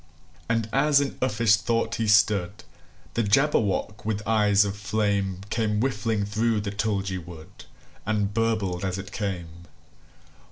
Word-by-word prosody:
And 115 Hz, -1 st, 0 dB
as 140 Hz, +1 st, +4 dB
in 140 Hz, -1 st, -1 dB
uffish 115 Hz, -4 st, +3 dB
thought 115 Hz, 0 st, -1 dB
he 110 Hz, -, 0 dB
stood, 100 Hz, -2 st, +2 dB, 0.5 s
The 115 Hz, -, +1 dB
Jabberwock, 105 Hz, -3 st, +1 dB
with 105 Hz, -1 st, -3 dB
eyes 105 Hz, -2 st, +4 dB
of 100 Hz, 0 st, -3 dB
flame, 100 Hz, -2 st, -1 dB
Came 105 Hz, -2 st, 0 dB
whiffling 110 Hz, -4 st, 0 dB
through 110 Hz, +1 st, 0 dB
the 100 Hz, -1 st, -4 dB
tulgey 100 Hz, -3 st, -2 dB
wood, 85 Hz, +2 st, -12 dB, 0.4 s
And 105 Hz, -1 st, -1 dB
burbled 110 Hz, -5 st, 0 dB
as 95 Hz, -1 st, -2 dB
it 100 Hz, +1 st, -8 dB
came! 90 Hz, -4 st, -5 dB
105 Hz, 135 wpm, -25 LUFS, 100-115 Hz, 0.5 s, as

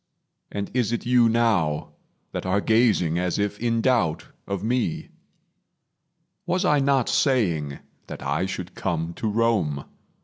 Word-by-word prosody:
And 100 Hz, 0 st, -4 dB
is 120 Hz, -4 st, +1 dB
it 120 Hz, -, -2 dB
you 120 Hz, -1 st, +4 dB
now 105 Hz, -10 st, +1 dB, 0.4 s
that -, -, -4 dB
are 95 Hz, +2 st, +1 dB
gazing 105 Hz, -7 st, +2 dB
As 90 Hz, -1 st, -1 dB
if 105 Hz, 0 st, -1 dB
in 115 Hz, -1 st, 0 dB
doubt 110 Hz, -11 st, +1 dB, 0.2 s
of 100 Hz, -1 st, -3 dB
me? 120 Hz, -6 st, -1 dB, 1.4 s
Was 180 Hz, +2 st, +1 dB
I 150 Hz, -5 st, +4 dB
not 135 Hz, -2 st, +2 dB
saying 85 Hz, -, +1 dB, 0.3 s
That -, -, -8 dB
I 75 Hz, +7 st, 0 dB
should 95 Hz, -1 st, -6 dB
come 85 Hz, -2 st, -2 dB
to 110 Hz, -, -2 dB
Rome? 105 Hz, -10 st, +1 dB
105 Hz, 140 wpm, -24 LUFS, 85-120 Hz, 1.4 s, you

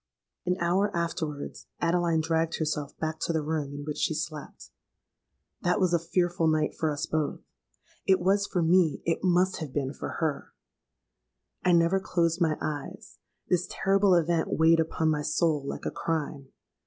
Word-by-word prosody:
"An 180 Hz, +1 st, +1 dB
hour 185 Hz, +4 st, +2 dB
afterwards 160 Hz, -4 st, -4 dB
Adeline 170 Hz, -1 st, +2 dB
dragged 165 Hz, +1 st, 0 dB
herself 150 Hz, -2 st, -3 dB
back 160 Hz, 0 st, -3 dB
to -, -, -1 dB
the 160 Hz, -2 st, 0 dB
room 150 Hz, -2 st, -2 dB
in 145 Hz, -, -6 dB
which 150 Hz, -1 st, -4 dB
she 160 Hz, -, +1 dB
slept. 155 Hz, -2 st, -6 dB, 0.9 s
That 180 Hz, -, +1 dB
was 185 Hz, -3 st, +2 dB
a 170 Hz, -, +4 dB
fearful 175 Hz, 0 st, 0 dB
night 155 Hz, -1 st, +1 dB
for 160 Hz, -, -1 dB
us 145 Hz, -, -2 dB
both: 155 Hz, -2 st, -2 dB, 0.7 s
it 190 Hz, -1 st, +5 dB
was 200 Hz, +3 st, +2 dB
for 175 Hz, -, 0 dB
me—it 165 Hz, -1 st, +2 dB
must 185 Hz, +1 st, +3 dB
have 155 Hz, -5 st, -6 dB
been 135 Hz, 0 st, -2 dB
for -, -, -6 dB
her! 155 Hz, -4 st, -2 dB, 1.1 s
I 180 Hz, -, +4 dB
never 170 Hz, +3 st, +4 dB
closed 170 Hz, -2 st, 0 dB
my 160 Hz, -2 st, +2 dB
eyes: 145 Hz, -, -6 dB, 0.3 s
this 180 Hz, 0 st, +1 dB
terrible 195 Hz, -1 st, +3 dB
event 170 Hz, -1 st, +2 dB
weighed 165 Hz, +1 st, +4 dB
upon 160 Hz, 0 st, +1 dB
my 150 Hz, -1 st, 0 dB
soul 150 Hz, 0 st, +1 dB
like 140 Hz, -, -5 dB
a -, -, -1 dB
crime. 150 Hz, -4 st, -3 dB
165 Hz, 165 wpm, -28 LUFS, 155-175 Hz, 1.1 s, it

